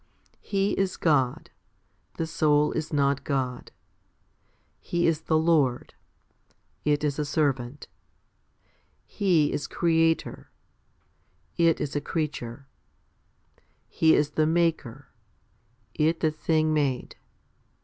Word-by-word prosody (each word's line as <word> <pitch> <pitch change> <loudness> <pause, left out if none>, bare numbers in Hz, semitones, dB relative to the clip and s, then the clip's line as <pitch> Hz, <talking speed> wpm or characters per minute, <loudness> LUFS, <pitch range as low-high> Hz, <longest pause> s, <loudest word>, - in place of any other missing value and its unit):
He 195 0 -1
is 195 -1 -1
God; 135 -6 0 0.7
the 165 - -1
soul 150 -2 +2
is 160 0 -4
not 140 -2 +1
God. 130 -4 -3 1.1
He 175 0 -1
is 165 -2 +1
the 160 0 +1
Lord; 155 -6 +1 0.9
it 150 0 +1
is 150 0 -1
a - - +1
servant. 140 -3 -2 1.2
He 175 -8 +1
is 145 - -3
Creator; 165 -1 0 1.1
it 165 -1 +3
is 145 - -4
a 145 - 0
creature. 145 -5 -4 1.2
He 160 0 +3
is 150 0 +1
the 155 +1 +1
Maker; 160 -6 -1 0.8
it 160 +2 +1
the 155 - +2
thing 155 0 0
made. 140 -5 -1
150 Hz, 105 wpm, -26 LUFS, 140-165 Hz, 1.2 s, it